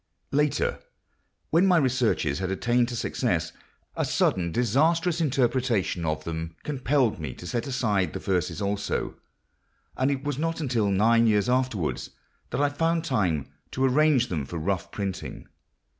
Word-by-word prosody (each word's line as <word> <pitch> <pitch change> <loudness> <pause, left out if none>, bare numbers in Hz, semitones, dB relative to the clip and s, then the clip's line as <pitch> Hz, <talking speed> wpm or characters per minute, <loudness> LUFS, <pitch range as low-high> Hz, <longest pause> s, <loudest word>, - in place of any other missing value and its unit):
Later, 150 +1 +1 0.7
when 170 +4 +4
my 180 -2 +5
researches 125 - +1
had 95 -1 -2
attained 120 +5 +1
to 120 - -5
success, 90 -8 -1 0.4
a - - 0
sudden 85 -2 +1
disastrous 160 - +2
interruption 125 - +1
of 80 -1 -1
them 80 0 -5
compelled 135 - +1
me 75 -6 -5
to - - -10
set 115 +8 -2
aside 105 -8 0
the - - -4
verses 90 -2 -1
also, 100 0 -2 0.8
and 130 +1 +1
it 140 -1 -2
was 145 -2 -2
not 165 +1 -1
until 120 -9 0
nine 115 +4 +4
years 105 -1 +3
afterwards 125 -9 0 0.4
that - - -2
I 145 - +3
found 165 +3 0
time 95 - 0 0.2
to 130 - 0
arrange 135 -2 +3
them 80 -7 -2
for 85 +5 -6
rough 95 +3 -2
printing. 100 -2 -5
120 Hz, 150 wpm, -26 LUFS, 95-140 Hz, 0.8 s, my